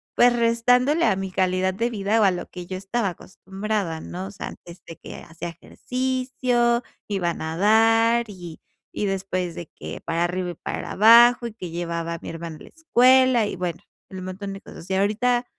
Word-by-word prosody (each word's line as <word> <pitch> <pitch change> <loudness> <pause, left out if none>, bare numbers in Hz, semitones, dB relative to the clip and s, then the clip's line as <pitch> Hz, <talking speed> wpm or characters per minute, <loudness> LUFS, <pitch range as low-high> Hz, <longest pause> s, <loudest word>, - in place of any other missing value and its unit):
pues, 245 0 +5
restándole 245 +6 +3
a 215 -4 +3
mi 195 0 -3
calidad 185 0 +1
de 230 +5 -1
vida 215 0 0
o - - +5
a 195 - +5
lo 175 -1 -4
que 180 -1 -8
yo 185 - -4
estaba 200 +2 -1
acostumbrada, 190 0 -4
¿no? 185 +2 -6
O - - -9
sea, 200 - -7
antes 170 +1 -12
de 165 - -9
que - - -10
hacía 170 +1 -7
ejercicio, 250 +3 -1 0.3
iba 185 -4 0
a - - -4
nadar 225 +7 +3
y, 175 -5 -10 0.3
y - - -2
después 185 -2 -2
de 170 - -7
que - - -7
para 165 +1 0
arriba 180 +1 -2
y - - -7
para - - -5
abajo, 235 +3 +7
y 230 - -9
que 185 -5 -7
llevaba 170 0 -3
a - - -8
mi - - -7
hermano 165 -1 -7
en - - -14
la - - -13
escuela 255 -6 +4
y 205 - -4
bueno, 175 -2 -3 0.3
el 190 -1 -8
montón 195 +2 -6
de 195 - -9
cosas. 170 - -12
Y - - -1
ahorita, 235 +5 +1
195 Hz, 200 wpm, -23 LUFS, 180-235 Hz, 0.3 s, abajo